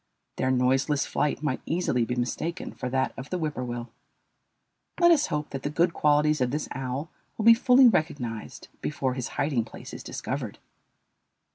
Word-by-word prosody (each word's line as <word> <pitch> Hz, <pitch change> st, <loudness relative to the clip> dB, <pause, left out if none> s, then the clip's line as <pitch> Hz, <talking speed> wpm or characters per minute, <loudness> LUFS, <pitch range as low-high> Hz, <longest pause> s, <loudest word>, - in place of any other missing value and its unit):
Their 130 Hz, -, +1 dB
noiseless 130 Hz, +3 st, +2 dB
flight 150 Hz, 0 st, -1 dB
might 135 Hz, -4 st, -1 dB
easily 160 Hz, -8 st, +1 dB
be 125 Hz, -, -2 dB
mistaken 155 Hz, +8 st, -3 dB
for 125 Hz, -, -4 dB
that 130 Hz, +1 st, 0 dB
of 135 Hz, +2 st, -8 dB
the 180 Hz, -, -1 dB
whippoorwill. 125 Hz, -7 st, -4 dB, 1.1 s
Let 345 Hz, -1 st, +6 dB
us 310 Hz, -3 st, +4 dB
hope 150 Hz, 0 st, -3 dB
that 135 Hz, -, -4 dB
the 145 Hz, -, -2 dB
good 165 Hz, +3 st, +2 dB
qualities 150 Hz, 0 st, +3 dB
of 125 Hz, -, +2 dB
this 150 Hz, +4 st, -2 dB
owl 135 Hz, +4 st, -4 dB, 0.3 s
will 220 Hz, -, -2 dB
be 230 Hz, -, +10 dB
fully 250 Hz, +2 st, +6 dB
recognized 135 Hz, -, -1 dB
before 135 Hz, -4 st, -1 dB
his 125 Hz, -2 st, -3 dB
hiding 135 Hz, -5 st, +1 dB
place 115 Hz, -, -11 dB
is -, -, -7 dB
discovered. -, -, -5 dB
145 Hz, 165 wpm, -27 LUFS, 125-160 Hz, 1.1 s, be